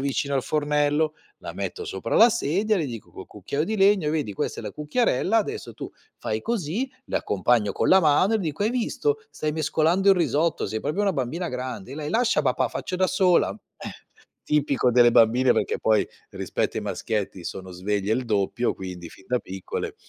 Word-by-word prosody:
vicino 140 +1 -1
al 135 - +1
fornello, 150 +1 +1 0.2
la - - -7
metto 440 - -4
sopra - - -4
la 230 - +8
sedia, 210 +1 +1
le 165 - -1
dico 115 -4 -8
col - - -10
cucchiaio 150 +3 -3
di 220 - -2
legno: 195 -5 +4
"E - - +1
vedi? 150 -9 -1
Questa - - -3
è - - -10
la 105 - -4
cucchiarella, 180 - +1
adesso 215 - -4
tu - - -7 0.3
fai 110 0 -3
così". 230 - -2 0.2
L'accompagno 105 +1 +1
con - - 0
la 190 - +7
mano 165 +6 +3
e - - +2
dico: 165 -2 -3
"Hai 215 - +2
visto? 255 - 0
Stai 155 - -3
mescolando 160 +5 +2
il 195 - +5
risotto, 160 0 +1
sei 110 +2 -3
proprio 160 +7 -2
una 200 -1 +2
bambina 155 +7 -2
grande". 125 -1 -5
Lei: 150 0 -5
"Lascia, 235 +1 +2
papà, - - +1
faccio - - -5
da 185 +1 +2
sola". 185 -1 +3 0.3
Eh, - - -6 0.6
tipico 140 -4 +1
delle 120 0 +6
bambine, 120 +3 +5
perché - - 0
poi, 110 -1 +3 0.3
rispetto - - -2
ai - - -3
maschietti, 100 -4 -3
sono 95 -1 -6
sveglie 100 +3 -2
il 125 +1 -2
doppio, 110 +2 0
quindi 90 -2 -7
fin 95 - -17
da 125 - +1
piccole. 95 -3 -5
150 Hz, 190 wpm, -25 LUFS, 115-185 Hz, 0.6 s, la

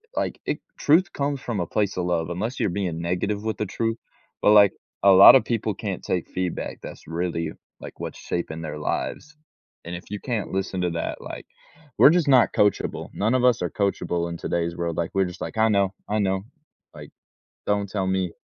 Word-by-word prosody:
like, - - -2
it - - -2 0.2
truth 175 +5 +3
comes 140 -1 -2
from 115 -5 -3
a 85 - -2
place 100 -3 -1
of 90 - -1
love- 85 -2 -1
unless 110 +9 -3
you're - - +1
being 85 -3 -3
negative 95 +5 -2
with 110 0 -2
the 105 - -1
truth- 115 +3 -2 0.5
but, 105 - +6
like, 100 -2 +7 0.3
a 100 - +7
lotta 95 +7 +10
people 110 -3 -2
can't 100 -3 -5
take 90 - -2
feedback 90 -2 -3
that's - - -10
really 85 -1 -2 0.3
like - - -10
what's - - -6
shaping 80 -2 -4
their 80 -2 -5
lives, 150 - -3 0.5
and 85 +1 -5
if 90 - -8
you 105 - -4
can't 115 -6 -3
listen 95 -1 -2
to 90 - +1
that, 85 - -4
like, - - -8 0.5
we're - - +8
just 170 -1 +2
not 125 -7 +5
coachable, 105 0 0
none 110 +4 0
of 125 - +1
us 125 -2 +4
are 90 - -1
coachable 90 -3 -1
in 85 - -5
today's 85 0 -2
world, 85 -1 -3
like, 85 - -1
we're 95 -1 +2
just 90 - -8
like, - - -5
"I 110 0 +4
know, 100 -2 +2 0.2
I 105 +1 +1
know," 95 -1 0 0.5
like, - - -11 0.6
"Don't 100 -1 0
tell 95 -1 -2
me." 95 -2 -1
95 Hz, 205 wpm, -24 LUFS, 85-110 Hz, 0.6 s, lotta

